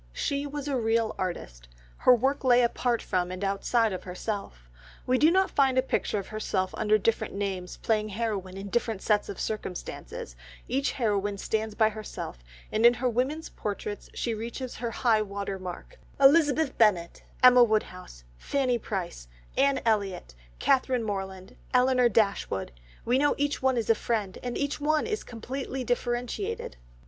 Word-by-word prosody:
She 280 Hz, -, -1 dB
was 290 Hz, 0 st, -5 dB
a 280 Hz, -, 0 dB
real 225 Hz, -1 st, +1 dB
artist. 60 Hz, -, -5 dB, 0.3 s
Her 250 Hz, -, +6 dB
work 270 Hz, +5 st, 0 dB
lay 250 Hz, -1 st, +5 dB
apart 235 Hz, 0 st, 0 dB
from 180 Hz, -1 st, 0 dB
and 185 Hz, +2 st, -5 dB
outside 205 Hz, +3 st, +1 dB
of 185 Hz, -, -4 dB
herself. 185 Hz, -, -5 dB, 0.4 s
We 255 Hz, 0 st, +2 dB
do 310 Hz, -, +6 dB
not 380 Hz, +2 st, +3 dB
find 265 Hz, -2 st, +3 dB
a 255 Hz, -, +4 dB
picture 255 Hz, -, -1 dB
of 195 Hz, -, -5 dB
herself 200 Hz, -3 st, -2 dB
under 215 Hz, 0 st, +3 dB
different 220 Hz, 0 st, -1 dB
names 190 Hz, -3 st, -3 dB
playing 215 Hz, -1 st, 0 dB
heroine 200 Hz, -3 st, -3 dB
in 200 Hz, +1 st, -6 dB
different 225 Hz, -2 st, -1 dB
sets 210 Hz, -1 st, +2 dB
of 200 Hz, -, -6 dB
circumstances; 180 Hz, -, -5 dB, 0.3 s
each 270 Hz, +3 st, 0 dB
heroine 205 Hz, -4 st, 0 dB
stands 220 Hz, +1 st, -2 dB
by 220 Hz, -1 st, +4 dB
herself, 215 Hz, -, -7 dB, 0.3 s
and 215 Hz, +1 st, 0 dB
in 240 Hz, +1 st, +7 dB
her 255 Hz, +2 st, -1 dB
women's 260 Hz, +7 st, -1 dB
portraits 205 Hz, 0 st, -5 dB
she 235 Hz, -, -1 dB
reaches 235 Hz, +3 st, -5 dB
her 235 Hz, 0 st, -3 dB
high 230 Hz, -1 st, +2 dB
water 200 Hz, -1 st, -4 dB
mark—Elizabeth 280 Hz, -, +2 dB
Bennet, 185 Hz, -7 st, +3 dB, 0.2 s
Emma 250 Hz, -1 st, +9 dB
Woodhouse, 185 Hz, -, -2 dB, 0.2 s
Fanny 255 Hz, -4 st, 0 dB
Price, 180 Hz, -, -5 dB, 0.3 s
Anne 275 Hz, 0 st, +3 dB
Elliot, 200 Hz, -, 0 dB, 0.2 s
Catherine 255 Hz, -, +2 dB
Morland, 190 Hz, -3 st, -5 dB, 0.2 s
Elinor 250 Hz, -1 st, +4 dB
Dashwood, 200 Hz, -, 0 dB, 0.3 s
we 245 Hz, +3 st, +3 dB
know 290 Hz, +1 st, +3 dB
each 290 Hz, 0 st, -1 dB
one 260 Hz, -1 st, +2 dB
as 230 Hz, -, -1 dB
a -, -, +7 dB
friend, 215 Hz, -4 st, -2 dB
and 245 Hz, -1 st, -3 dB
each 285 Hz, +1 st, -2 dB
one 305 Hz, +1 st, +2 dB
is 430 Hz, -1 st, -2 dB
completely 255 Hz, +3 st, -5 dB
differentiated. 245 Hz, -, -2 dB
225 Hz, 160 wpm, -28 LUFS, 200-255 Hz, 0.4 s, Emma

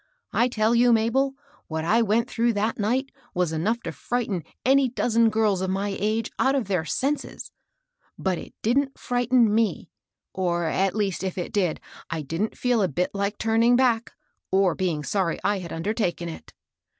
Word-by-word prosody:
I 235 Hz, +2 st, +3 dB
tell 220 Hz, -2 st, +1 dB
you, 240 Hz, +1 st, +5 dB
Mabel, 245 Hz, +5 st, +2 dB, 0.3 s
what 160 Hz, 0 st, -3 dB
I 225 Hz, +7 st, +3 dB
went 225 Hz, +1 st, +2 dB
through 235 Hz, 0 st, +1 dB
that 215 Hz, +2 st, -1 dB
night 255 Hz, +6 st, 0 dB, 0.2 s
was 180 Hz, -2 st, +1 dB
enough 215 Hz, +9 st, 0 dB
to -, -, -5 dB
frighten 220 Hz, -8 st, -2 dB, 0.2 s
any 270 Hz, 0 st, +4 dB
dozen 230 Hz, -1 st, +2 dB
girls 215 Hz, -4 st, +1 dB
of 190 Hz, -, -1 dB
my 195 Hz, +1 st, -1 dB
age 220 Hz, +2 st, -1 dB
out 270 Hz, +1 st, +3 dB
of 260 Hz, -7 st, -1 dB
their 180 Hz, -5 st, 0 dB
senses. 280 Hz, -, -2 dB, 0.7 s
But 185 Hz, -2 st, -1 dB
it -, -, -11 dB
didn't 270 Hz, +5 st, +1 dB
frighten 245 Hz, -1 st, +2 dB
7»e, 220 Hz, +1 st, 0 dB, 0.4 s
or, 175 Hz, -2 st, 0 dB
at 190 Hz, +4 st, +1 dB
least, 200 Hz, -4 st, -1 dB
if 190 Hz, -1 st, -3 dB
it 175 Hz, -, -4 dB
did, 180 Hz, -6 st, +1 dB, 0.3 s
I 160 Hz, -2 st, -3 dB
didn't 165 Hz, +10 st, -3 dB
feel 245 Hz, -3 st, +2 dB
a 190 Hz, -, +3 dB
bit 180 Hz, +3 st, -2 dB
Kke 200 Hz, +1 st, -2 dB
turning 225 Hz, +2 st, +3 dB
back, 240 Hz, -3 st, +2 dB, 0.4 s
or 190 Hz, -2 st, +3 dB
being 170 Hz, -6 st, -1 dB
sorry 185 Hz, 0 st, 0 dB
I 205 Hz, -1 st, +1 dB
had 170 Hz, -3 st, -8 dB
undertaken 175 Hz, -1 st, -2 dB
it. 160 Hz, -, -10 dB
215 Hz, 175 wpm, -25 LUFS, 185-235 Hz, 0.7 s, you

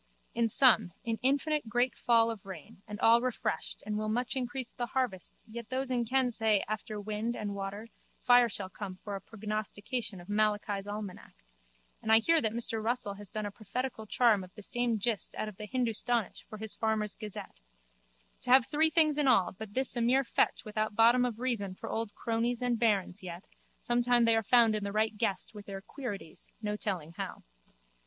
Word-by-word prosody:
In 235 Hz, -1 st, +2 dB
sum 220 Hz, -, +5 dB
an 225 Hz, -1 st, -1 dB
infinite 280 Hz, 0 st, +1 dB
great 245 Hz, +2 st, +1 dB
fall 230 Hz, -1 st, +3 dB
of 220 Hz, -4 st, -8 dB
rain 190 Hz, -1 st, -10 dB
and 210 Hz, -1 st, -7 dB
all 230 Hz, +1 st, +6 dB
refreshed 250 Hz, -9 st, -2 dB
and 210 Hz, 0 st, -2 dB
will 215 Hz, 0 st, -2 dB
much 245 Hz, +4 st, -1 dB
increase 255 Hz, -1 st, -3 dB
the 240 Hz, -1 st, -3 dB
harvest 230 Hz, -9 st, -2 dB
yet 235 Hz, 0 st, -8 dB
those 260 Hz, 0 st, -1 dB
in 240 Hz, -2 st, +1 dB
ken 255 Hz, +1 st, +2 dB
say 220 Hz, -3 st, +3 dB
after 215 Hz, 0 st, -4 dB
wind 215 Hz, +3 st, -3 dB
and 205 Hz, -1 st, -3 dB
water 200 Hz, +2 st, -5 dB, 0.3 s
fire 245 Hz, -1 st, +5 dB
shall 200 Hz, -2 st, -3 dB
come 185 Hz, 0 st, -7 dB
for 200 Hz, +2 st, -6 dB
a 195 Hz, -, -6 dB
prognostication 215 Hz, 0 st, -4 dB
of 175 Hz, -, -12 dB
Malachi's 205 Hz, -1 st, 0 dB
almanac 205 Hz, -2 st, -7 dB, 0.7 s
(and 220 Hz, -, -1 dB
I 220 Hz, -, +9 dB
hear 325 Hz, +8 st, +3 dB
that 220 Hz, -, 0 dB
Mr 225 Hz, -1 st, -2 dB
Russell 230 Hz, -3 st, +1 dB
has 205 Hz, 0 st, -11 dB
done 215 Hz, -2 st, -4 dB
a 205 Hz, -, -4 dB
prophetical 220 Hz, +2 st, -5 dB
charm 220 Hz, -4 st, +3 dB
of 185 Hz, -, -12 dB
the 210 Hz, -, -10 dB
same 240 Hz, 0 st, 0 dB
gist 215 Hz, 0 st, -2 dB
out -, -, -3 dB
of 210 Hz, -3 st, -8 dB
the 210 Hz, -, -7 dB
Hindustanish 235 Hz, -2 st, -1 dB
for 215 Hz, -, -9 dB
his 220 Hz, 0 st, -2 dB
farmer's 220 Hz, -2 st, 0 dB
gazette) 210 Hz, -3 st, -8 dB, 0.8 s
to -, -, -6 dB
have 255 Hz, -1 st, +7 dB
three 315 Hz, +4 st, +2 dB
things 310 Hz, -2 st, +3 dB
in 290 Hz, -, +2 dB
all 195 Hz, -9 st, +4 dB
but 205 Hz, +1 st, -9 dB
this 260 Hz, -1 st, +1 dB
a 240 Hz, -, 0 dB
mere 255 Hz, +4 st, +4 dB
fetch 235 Hz, -, 0 dB
without 215 Hz, 0 st, -2 dB
bottom 235 Hz, +3 st, +5 dB
of 240 Hz, -3 st, -3 dB
reason 225 Hz, -7 st, -1 dB
for -, -, -7 dB
old 225 Hz, -2 st, -3 dB
crones 235 Hz, +1 st, -1 dB
and 240 Hz, -2 st, +1 dB
bairns 205 Hz, -4 st, +1 dB
yet 175 Hz, 0 st, -7 dB, 0.4 s
sometimes 240 Hz, 0 st, +3 dB
they 230 Hz, 0 st, +5 dB
are 225 Hz, -, +3 dB
found 230 Hz, 0 st, +5 dB
in 210 Hz, -1 st, 0 dB
the 200 Hz, -, -3 dB
right 215 Hz, +1 st, +1 dB
guess 210 Hz, -2 st, -1 dB
with 205 Hz, -1 st, -10 dB
their 195 Hz, -1 st, -5 dB
queerities 200 Hz, -, -7 dB
no 210 Hz, -2 st, -2 dB
telling 185 Hz, -7 st, -3 dB
how. -, -, -5 dB
220 Hz, 200 wpm, -31 LUFS, 205-245 Hz, 0.8 s, I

